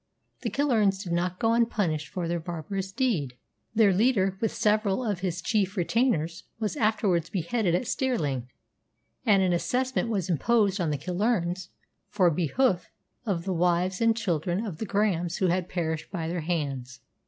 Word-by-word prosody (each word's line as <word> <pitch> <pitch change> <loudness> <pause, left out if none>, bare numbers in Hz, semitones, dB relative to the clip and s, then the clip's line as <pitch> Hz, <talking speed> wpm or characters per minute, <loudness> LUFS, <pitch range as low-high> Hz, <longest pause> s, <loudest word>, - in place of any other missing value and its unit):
The - - -1
Killearns 215 -9 +2
did 175 -3 -3
not 175 +1 0
go 225 +3 +2
unpunished 205 -10 +1
for 175 +3 -4
their 170 0 -1
barbarous 175 +3 -4
deed. 190 - 0 0.4
Their 215 -3 +5
leader, 195 -2 +2
with 225 - +1
several 210 +2 +1
of 205 -5 -1
his 180 -2 -3
chief 205 -3 0
retainers, 175 - 0
was 210 -5 -2
afterwards 205 -6 +1
beheaded 185 0 0
at 180 - -1
Stirling, 145 - -1 0.8
and 200 -3 +5
an 180 -1 +2
assessment 250 +6 0
was 195 -6 -1
imposed 195 - +2
on 165 - 0
the 150 - 0
Killearns 180 - -1 0.4
for 185 -4 +3
behoof 175 - +1 0.4
of 175 -5 0
the 190 - -1
wives 180 +2 +1
and 230 0 +3
children 180 -1 -1
of 175 -7 -6
the 220 - -3
Grahams 185 -4 0
who 185 - +2
had 180 +1 0
perished 160 -3 -2
by 170 -4 -3
their 170 +1 -2
hands. 140 -7 -3
185 Hz, 165 wpm, -27 LUFS, 170-215 Hz, 0.8 s, Their